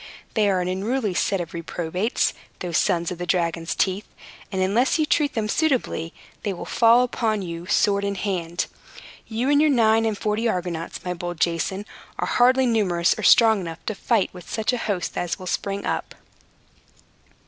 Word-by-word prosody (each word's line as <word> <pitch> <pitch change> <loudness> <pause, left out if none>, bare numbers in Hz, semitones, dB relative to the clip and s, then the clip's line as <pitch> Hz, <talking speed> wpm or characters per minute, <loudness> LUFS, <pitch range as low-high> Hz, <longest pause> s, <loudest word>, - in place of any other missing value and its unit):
They 210 -3 +3
are 185 -2 +1
an 180 - -2
unruly 205 +3 -1
set 195 +2 0
of 170 -2 -5
reprobates, 175 +5 -1 0.2
those 175 -3 -1
sons 170 0 +1
of 180 - -6
the 175 - -4
dragon's 170 -1 0
teeth; 195 +1 0 0.4
and 190 - -2
unless 210 - +2
you 310 - +2
treat 300 -2 +1
them 220 -2 0
suitably, 255 - 0 0.3
they 205 -3 -2
will 175 - -7
fall 235 +1 +5
upon 220 -4 -1
you 170 0 -6
sword 200 0 +2
in 200 0 -1
hand. 175 -4 -2 0.6
You 230 +3 -2
and 290 0 +5
your 310 - +4
nine 225 -4 +4
and 215 -2 -1
forty 215 +3 0
Argonauts, 175 -2 -4
my 180 - -1
bold 175 -1 -6
Jason, 175 +5 0 0.3
are - - -1
hardly 255 +2 +4
numerous 195 -7 +2
or - - -6
strong 220 -3 +6
enough 165 -2 -7
to 220 - -1
fight 215 0 0
with 180 -3 -12
such 220 +3 -1
a 245 - -1
host 200 -6 -2
as 175 -1 -2
will 185 - -9
spring 200 +2 -2
up." - - -3
195 Hz, 180 wpm, -23 LUFS, 175-225 Hz, 0.6 s, strong